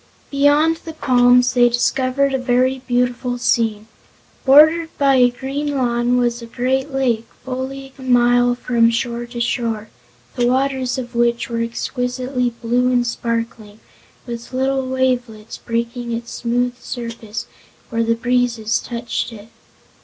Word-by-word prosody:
Beyond 290 +3 +3
the 325 0 -9
palms 250 -3 +4
they 245 -1 +5
discovered 255 +3 +1
a 265 - +1
very 255 +1 +1
beautiful 245 0 0
scene. 225 -3 0 0.6
Bordered 310 +4 +6
by 275 -2 +4
a 245 -1 +5
green 275 +3 -3
lawn 240 -1 +1
was 240 -1 0
a 235 - -8
great 265 +4 -1
lake 245 -4 0 0.2
fully 265 +1 -5
a - - -10
mile 245 -1 +3
from 235 -2 +2
shore 235 0 -2
to 240 0 -7
shore, 230 -2 -2 0.5
the 240 -1 +1
waters 260 0 0
of 245 -1 -6
which 235 0 +1
were 230 -1 -2
exquisitely 250 +2 -2
blue 240 +2 0
and 245 -1 +2
sparkling, 230 -2 -4 0.5
with 235 -1 -7
little 265 0 0
wavelets 250 -4 -2
breaking 235 +1 -3
its 235 0 -4
smooth 245 +1 -1
surface 230 -3 -6 0.5
where 230 0 +1
the 230 0 +1
breezes 240 -2 0
touched 235 -1 -4
it. 215 -1 -12
245 Hz, 140 wpm, -19 LUFS, 235-260 Hz, 0.6 s, Bordered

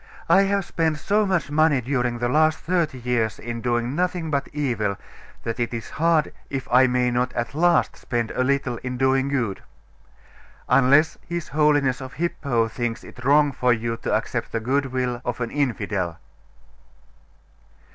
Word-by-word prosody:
I 195 - +6
have 200 -2 0
spent 160 -3 0
so 210 +6 +1
much 180 -6 0
money 155 -2 +3
during 125 -1 -1
the 120 +1 -1
last 155 +4 +3
thirty 170 -6 -1
years 120 -3 -1
in 115 0 -6
doing 120 +1 0
nothing 175 -1 -1
but 140 -1 0
evil, 115 -9 -1 0.5
that 115 +1 -4
it 120 0 -1
is 115 - -7
hard 165 -2 +2 0.2
if 135 -2 -4
I 130 +1 +6
may 125 0 +1
not 125 +1 0
at 120 +3 -3
last 170 +3 +2
spend 120 -2 -3
a 130 - 0
little 135 -2 0
in 125 +1 -5
doing 130 +1 +2
good. 120 -8 -1 1.1
Unless 140 +5 +4
his 170 -1 -4
Holiness 145 -3 +2
of 130 -1 -8
Hippo 140 -8 0
thinks 120 0 -4
it 125 - -12
wrong 145 +2 +4
for 125 -1 +1
you 115 0 -2
to - - -4
accept - - -1
the 115 - -1
goodwill 130 0 -1
of 120 -1 -3
an 115 -2 -3
infidel? 105 - -1
130 Hz, 165 wpm, -23 LUFS, 120-150 Hz, 1.1 s, I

